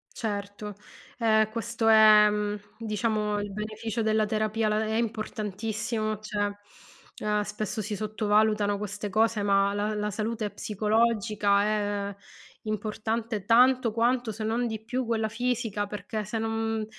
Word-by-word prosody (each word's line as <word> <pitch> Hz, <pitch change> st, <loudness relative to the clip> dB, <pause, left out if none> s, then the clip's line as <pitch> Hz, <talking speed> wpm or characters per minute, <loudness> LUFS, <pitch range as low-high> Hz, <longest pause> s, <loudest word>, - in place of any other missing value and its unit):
Certo, 205 Hz, -1 st, -4 dB, 0.4 s
ehm, 220 Hz, -2 st, +3 dB
questo 230 Hz, 0 st, -2 dB
è, 215 Hz, -1 st, +8 dB
mhmm, 210 Hz, 0 st, -1 dB, 0.2 s
diciamo 215 Hz, -1 st, -1 dB
il 205 Hz, 0 st, -4 dB
beneficio 215 Hz, +2 st, -4 dB
della 220 Hz, 0 st, +2 dB
terapia 215 Hz, +1 st, 0 dB
la 215 Hz, +1 st, +1 dB
è 220 Hz, 0 st, -1 dB
importantissimo, 215 Hz, -1 st, -2 dB
cioè, 205 Hz, -1 st, -2 dB, 0.7 s
ehm, 210 Hz, 0 st, +1 dB
spesso 210 Hz, +1 st, -4 dB
si 210 Hz, +1 st, -3 dB
sottovalutano 210 Hz, -1 st, +1 dB
queste 210 Hz, 0 st, -5 dB
cose, 220 Hz, +1 st, +2 dB
ma 200 Hz, 0 st, +3 dB
la 205 Hz, +1 st, -1 dB
la 210 Hz, 0 st, -1 dB
salute 215 Hz, +1 st, -2 dB
psicologica 210 Hz, -1 st, +1 dB
è 205 Hz, -1 st, -1 dB, 0.5 s
importante 215 Hz, 0 st, -3 dB
tanto 245 Hz, 0 st, +5 dB
quanto, 240 Hz, +1 st, +1 dB
se 220 Hz, +1 st, -6 dB
non 230 Hz, +3 st, 0 dB
di 220 Hz, -1 st, -5 dB
più, 250 Hz, +3 st, -2 dB
quella 225 Hz, -1 st, 0 dB
fisica, 225 Hz, -3 st, -1 dB
perché 210 Hz, +1 st, -5 dB
se 210 Hz, +4 st, -3 dB
non 225 Hz, 0 st, -1 dB
215 Hz, 135 wpm, -27 LUFS, 210-225 Hz, 0.7 s, è